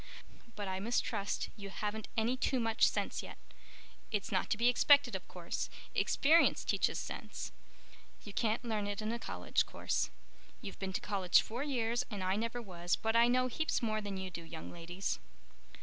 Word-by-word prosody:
"But 205 -1 -4
I 190 0 -2
mistrust 205 -2 -1
you 200 -1 -7
haven't 210 +2 -3
any 230 +3 +2
too 260 0 +1
much 225 -1 +4
sense - - -1
yet. - - -9 0.7
It's 210 -2 -1
not - - +1
to - - +2
be 235 +2 +3
expected, 285 +3 +6
of - - -5
course. - - -4 0.2
Experience 320 +4 +4
teaches - - +1
sense. - - -5 0.7
You 205 - -8
can't 220 +2 0
learn 215 -3 -1
it 205 +1 -3
in 215 - -1
a 235 - -2
college 90 - 0
course. - - -1 0.5
You've 195 - -8
been 190 -1 -3
to - - -1
college 195 -4 +3
four 235 +4 -4
years 240 -5 0
and 205 -5 -4
I 185 +1 +1
never 230 +3 -2
was, 175 -3 -1
but 225 0 -1
I 235 +1 +7
know 255 +1 +3
heaps 260 +1 -1
more 215 -1 0
than 200 -2 -4
you 190 -1 -4
do, 170 - -6
young 165 -1 -8
ladies." 175 +3 -3
215 Hz, 180 wpm, -34 LUFS, 195-235 Hz, 0.7 s, I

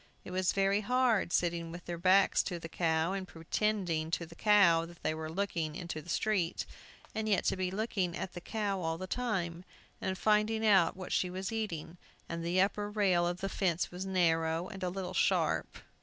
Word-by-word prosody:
It - - -7
was 185 0 +1
very 195 +1 +2
hard, 240 -4 +2
sitting 170 -1 0
with 175 +1 -9
their 170 -1 -5
backs 190 +2 +5
to 175 - -3
the 165 - -7
cow, 165 +1 0
and 190 -1 -4
pretending 170 -1 -1
to 170 +1 -1
the 165 - -13
cow 190 -4 +5
that 170 0 -15
they - - +1
were 155 0 -5
looking 165 -4 -2
into 170 -3 -5
the 170 - -14
street, 190 -2 0 0.5
and 220 0 -2
yet 200 - +3
to - - +2
be 185 -1 -1
looking 190 -3 -1
at 185 - -5
the 175 - -7
cow 205 -1 -2
all 165 -1 -1
the 185 - -5
time, 185 -7 -2 0.4
and 190 0 -2
finding 215 +2 +2
out 190 -5 +4
what 185 -1 -7
she 180 - +1
was 185 +3 -4
eating; 180 -7 -4 0.3
and 165 0 -4
the 175 +2 +1
upper 205 +2 +1
rail 190 -5 +2
of 175 +1 -3
the 195 - -1
fence 180 -3 0
was 180 +1 -5
narrow 165 -2 +1
and 195 -2 -8
a 180 - 0
little 185 0 -5
sharp. - - +1
185 Hz, 200 wpm, -32 LUFS, 170-200 Hz, 0.5 s, backs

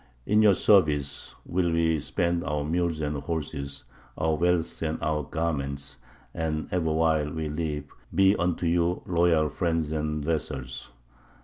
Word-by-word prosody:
In 105 +1 +4
your 105 -3 +6
service 75 -10 +2
will 90 -1 0
we 80 -1 +2
spend 85 +3 0
our 75 -4 -1
mules 85 0 0
and 75 -1 -1
horses, 70 -4 -4 0.3
our 80 0 +1
wealth 85 +1 0
and 80 -1 -1
our 75 -1 0
garments, 70 -3 -3 0.3
and 80 -1 -2
ever 85 -3 +1
while 80 -2 +2
we 80 -2 -3
live 75 -1 -2 0.3
be 95 +1 +5
unto 90 -1 0
you 85 +1 +1
loyal 85 -3 +3
friends 80 -1 -1
and 75 -1 -2
vassals. 75 -5 -3
80 Hz, 140 wpm, -27 LUFS, 75-85 Hz, 0.3 s, your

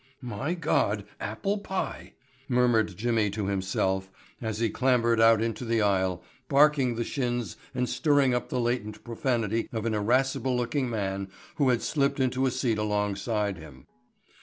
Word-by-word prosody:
"My 125 - -3
God, 105 - 0
apple 195 - -2
pie," 190 -1 -4 0.4
murmured 120 -6 +2
Jimmy 110 -1 +1
to 100 0 -3
himself 95 0 -1 0.3
as 110 -2 -3
he 115 +1 +1
clambered 120 -3 +2
out 115 -1 +6
into 115 +1 -3
the 115 -2 +1
aisle, 95 -3 +1 0.3
barking 140 -3 +4
the 120 - -1
shins 120 - -2 0.2
and 125 0 0
stirring 145 -4 +3
up 125 - -2
the 125 - -1
latent 120 -3 -2
profanity 115 -2 -1
of 115 -1 -3
an 115 - 0
irascible 125 +4 +1
looking 125 +2 -1
man 100 -3 -2 0.3
who 140 -3 +3
had 120 -2 +1
slipped 140 -2 0
into 130 0 +1
a - - +3
seat 120 -3 0
alongside 105 -1 -1
him. 70 -5 -13
115 Hz, 155 wpm, -27 LUFS, 105-125 Hz, 0.4 s, out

